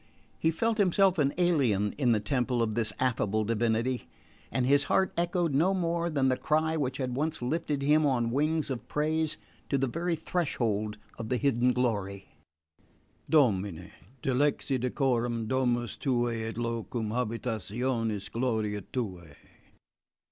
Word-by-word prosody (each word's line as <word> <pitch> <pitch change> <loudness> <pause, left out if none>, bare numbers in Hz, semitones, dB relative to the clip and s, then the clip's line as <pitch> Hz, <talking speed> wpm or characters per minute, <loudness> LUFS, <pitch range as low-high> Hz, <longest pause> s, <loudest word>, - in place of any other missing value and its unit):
He 160 - +2
felt 225 +7 0
himself 190 -2 +3
an 140 -1 +3
alien 130 - +2
in 130 -4 +2
the 110 - +3
temple 125 +1 0
of 110 -1 -1
this 110 -1 0
affable 110 -4 +1
divinity, 115 +3 0 0.4
and 130 - +1
his 140 +2 +4
heart 190 +5 +2
echoed 175 -2 0
no 175 +8 +3
more 170 -1 0
than 140 -4 +1
the 130 -1 +2
cry 155 +4 +1
which 135 -3 -1
had 125 -2 -2
once 155 +4 -1
lifted 145 +2 -1
him 150 +2 +4
on 120 -4 +1
wings 150 +2 0
of 125 - -5
praise 155 +1 0 0.3
to 140 - +2
the 135 - +1
very 165 +6 -1
threshold 115 - -1 0.2
of 115 -1 -5
the 125 - +1
hidden 125 -2 +2
glory 100 -6 -2 1.0
Domine, 100 - +2 0.3
dilexi 135 0 +1
decorem 120 -2 0
domus 120 -1 0
tuae 120 -4 0
et 115 - -8
locum 115 -1 -3
habitationis 115 -2 -2
gloriae 110 -4 -1
tuae! 90 - -4
125 Hz, 140 wpm, -29 LUFS, 115-150 Hz, 1.0 s, his